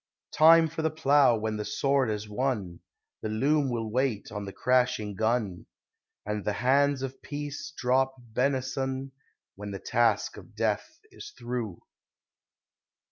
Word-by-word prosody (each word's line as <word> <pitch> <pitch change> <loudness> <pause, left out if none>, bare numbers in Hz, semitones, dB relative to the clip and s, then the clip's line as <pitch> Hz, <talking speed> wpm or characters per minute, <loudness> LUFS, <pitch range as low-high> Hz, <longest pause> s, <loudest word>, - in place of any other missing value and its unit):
Time 165 +1 +7
for 160 +1 -5
the 160 - +1
plough 140 -5 +4
when 110 0 -2
the 105 - -3
sword 135 +1 +1
has 105 0 -3
won; 105 -6 -2 0.4
The 110 - -3
loom 140 +6 +2
will 115 -3 -3
wait 125 -3 -1
on 105 -1 -5
the 100 - -6
crashing 125 -3 +1
gun, 110 -3 -1 0.6
And 105 0 -3
the 105 - -1
hands 135 +4 +2
of 135 0 -6
peace 145 +1 -6
drop 130 +2 +1
benison 130 +2 -2 0.4
When 105 +1 -8
the 100 -1 -5
task 115 -1 +1
of 110 - -13
death 110 - -2
is 420 - -10
through. 120 -7 -4
125 Hz, 140 wpm, -28 LUFS, 110-135 Hz, 0.6 s, Time